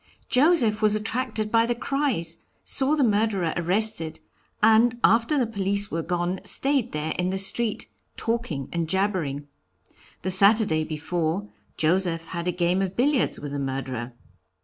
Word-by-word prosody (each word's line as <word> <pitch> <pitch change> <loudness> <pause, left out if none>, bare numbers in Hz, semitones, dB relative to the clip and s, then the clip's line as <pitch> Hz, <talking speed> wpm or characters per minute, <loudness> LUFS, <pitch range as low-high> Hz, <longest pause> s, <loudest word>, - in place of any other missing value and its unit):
Joseph 255 -6 +3
was 215 -1 +3
attracted 220 0 -2
by 230 0 +3
the 240 - -1
cries, 240 - -2 0.2
saw 280 +2 +2
the 290 - +1
murderer 205 -6 0
arrested, 175 -2 +1 0.4
and 225 +2 +4
after 230 +6 +3
the 255 - +2
police 200 -2 -1
were 165 - -2
gone 175 +2 -2
stayed 265 +5 +1
there 150 +1 -3
in 180 0 0
the 190 - -2
street, 215 +3 +1 0.3
talking 225 - -3
and 170 -2 -2
jabbering. 170 -7 -2 0.8
The 190 - -2
Saturday 200 -4 +5
before, 160 +5 -3 0.3
Joseph 165 0 +1
had 170 0 -5
a - - +1
game 175 +1 0
of 190 -1 -3
billiards 275 +2 +1
with 145 -1 -7
the 145 - -4
murderer." 130 -3 -5
195 Hz, 150 wpm, -24 LUFS, 165-225 Hz, 0.8 s, Saturday